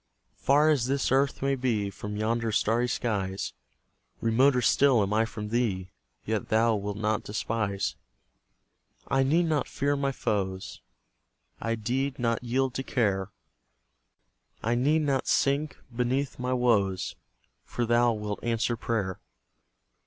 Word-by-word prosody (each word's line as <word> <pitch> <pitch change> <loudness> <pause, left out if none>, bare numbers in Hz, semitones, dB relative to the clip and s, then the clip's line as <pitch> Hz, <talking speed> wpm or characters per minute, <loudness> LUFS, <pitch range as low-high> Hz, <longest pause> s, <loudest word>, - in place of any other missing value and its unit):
Far 150 +3 +4
as 130 -5 +1
this 135 -1 0
earth 135 +1 +2
may 135 0 +2
be 115 -6 0
From 105 +1 -6
yonder 115 +1 0
starry 115 +3 +2
skies; 100 -6 -2 0.7
Remoter 125 +4 +3
still 125 -1 +4
am 100 +1 -1
I 110 +1 +3
from 105 -2 -6
Thee: 100 -6 -1 0.3
Yet 110 -1 -2
Thou 115 +1 +3
wilt 100 0 -3
not 110 0 0
despise. 105 - -2 1.2
I 135 0 +3
need 160 +6 +3
not 155 -3 0
fear 145 +1 0
my 140 -1 0
foes, 95 -7 -3 0.8
I 115 +1 0
deed 130 +5 -2
not 115 -1 0
yield 130 +2 0
to 135 - -3
care; 100 -7 0 1.3
I 115 - +1
need 145 +6 +2
not 135 -3 0
sink 140 +2 +1 0.2
beneath 130 +3 -1
my 125 +1 -2
woes, 105 -7 +1 0.5
For 120 - -2
Thou 120 0 +3
wilt 105 -1 -4
answer 120 0 0
prayer. 105 -5 -2
115 Hz, 135 wpm, -28 LUFS, 105-135 Hz, 1.3 s, Far